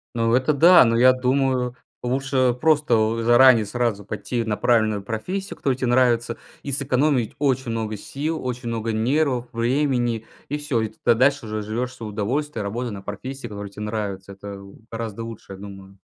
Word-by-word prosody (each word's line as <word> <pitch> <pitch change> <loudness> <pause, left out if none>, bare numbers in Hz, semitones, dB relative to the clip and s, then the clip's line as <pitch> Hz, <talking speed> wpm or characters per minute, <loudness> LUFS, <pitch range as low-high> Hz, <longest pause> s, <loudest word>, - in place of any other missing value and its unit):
Ну 115 0 +1
это 130 +4 +3
да, 170 +4 +8
но 115 0 +2
я 130 +1 +6
думаю, 130 -1 0 0.3
лучше 130 0 +1
просто 115 -8 +2
заранее 120 -1 +6
сразу 110 -2 -1
пойти 110 +3 -3
на 110 -2 -1
правильную 110 -4 +2
профессию, 180 - -4
которая 135 -2 0
тебе 130 -1 -1
нравится, 120 -1 +2 0.3
и 140 - -4
сэкономить 135 -2 +1
очень 130 -4 0
много 110 -2 -3
сил, 155 +8 -4
очень 125 -1 -4
много 115 -1 -2
нервов, 125 +2 +1
времени, 120 -2 0 0.2
и 150 - -1
всё. 145 -6 -1
И 110 - -2
тогда 110 - +1
дальше 130 +1 +2
уже 110 0 -3
живешь 115 +4 -3
в - - -14
свое 110 -4 -7
удовольствие, 115 +4 -2
работая 115 +4 -3
на 100 -1 -7
профессии, 120 +6 -6
которая 100 -1 -7
тебе 105 +1 -8
нравится. 100 -3 -4
Это 100 0 -9 0.3
гораздо 115 -1 -5
лучше, 115 -3 -9
я 95 - -10
думаю. 95 -1 -11
120 Hz, 175 wpm, -23 LUFS, 110-130 Hz, 0.3 s, да